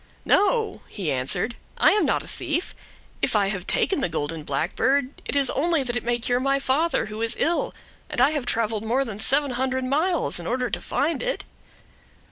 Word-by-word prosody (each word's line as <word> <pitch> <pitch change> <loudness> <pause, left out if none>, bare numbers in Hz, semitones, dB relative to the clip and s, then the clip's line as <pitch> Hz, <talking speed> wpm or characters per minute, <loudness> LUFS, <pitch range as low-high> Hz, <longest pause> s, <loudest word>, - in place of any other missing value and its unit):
"No," 445 +2 +2
he 185 -7 -3
answered, 135 - 0 0.2
"I - - +5
am 420 - +2
not - - +1
a - - -11
thief. 340 +1 -3 0.5
If 250 - +1
I 200 -2 +3
have 195 -3 -4
taken 380 -8 +1
the - - 0
golden 160 0 -3
blackbird, 250 - 0
it - - -2
is 280 -2 +4
only 320 +1 +1
that 245 -2 -3
it 245 - -1
may 240 0 +1
cure 245 +1 0
my 275 +1 +2
father, 275 +5 +1
who 215 +1 -7
is 230 0 0
ill, 340 +1 +1 0.4
and - - +1
I 265 +4 +5
have 290 -5 -3
traveled 225 -2 0
more 250 +5 +1
than 215 -4 -7
seven 280 +4 +3
hundred 260 +1 -1
miles 310 - 0
in 170 - -6
order 250 0 -1
to - - -2
find 320 +3 -1
it." - - -2
255 Hz, 200 wpm, -24 LUFS, 220-290 Hz, 0.5 s, I